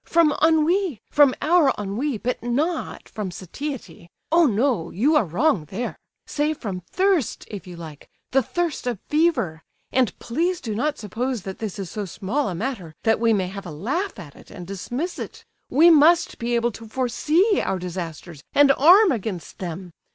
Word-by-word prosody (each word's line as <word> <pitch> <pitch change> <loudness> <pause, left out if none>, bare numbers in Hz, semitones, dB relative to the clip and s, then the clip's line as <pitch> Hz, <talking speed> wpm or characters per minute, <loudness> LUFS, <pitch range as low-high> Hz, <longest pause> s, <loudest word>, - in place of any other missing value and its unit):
"From 330 -2 +3
ennui, 320 - +3
from 285 -3 +5
our 315 -2 +4
ennui 215 +7 -2
but 250 +4 -3
not 295 +8 -2
from 210 -4 -5
satiety! 185 - -7 0.2
Oh, 335 -1 +5
no, 225 -6 +1
you 280 - +2
are 295 - +4
wrong 180 - +1
there! 200 +10 -4 0.3
Say 300 +1 -1
from 195 -9 -5
thirst 375 - +1
if 200 -3 -7
you 180 - -8
like; 160 -4 -10 0.2
the 270 - +4
thirst 335 +2 -2
of 240 -3 -1
fever! 275 - +1 0.3
And 255 -6 +1
please 335 +9 -1
do 220 - -4
not 290 +8 -1
suppose 230 +2 -3
that 190 -2 -7
this 215 -4 -4
is 195 -3 -6
so 210 -2 -4
small 210 +9 -2
a 180 - -4
matter 190 -6 -4
that 225 -1 +3
we 230 0 +3
may 195 -4 +2
have 195 0 -8
a - - -6
laugh 265 - -3
at 160 -7 -10
it - - -16
and 180 - -9
dismiss 240 - -4
it; - - -8 0.2
we 330 +5 +6
must 330 +3 +4
be 235 +1 -1
able 235 0 +1
to 225 +1 -11
foresee 300 - +1
our 190 - -1
disasters 170 -3 -6
and 285 -1 +7
arm 360 +9 +6
against 205 - -4
them. 180 0 -6
240 Hz, 180 wpm, -23 LUFS, 190-300 Hz, 0.3 s, and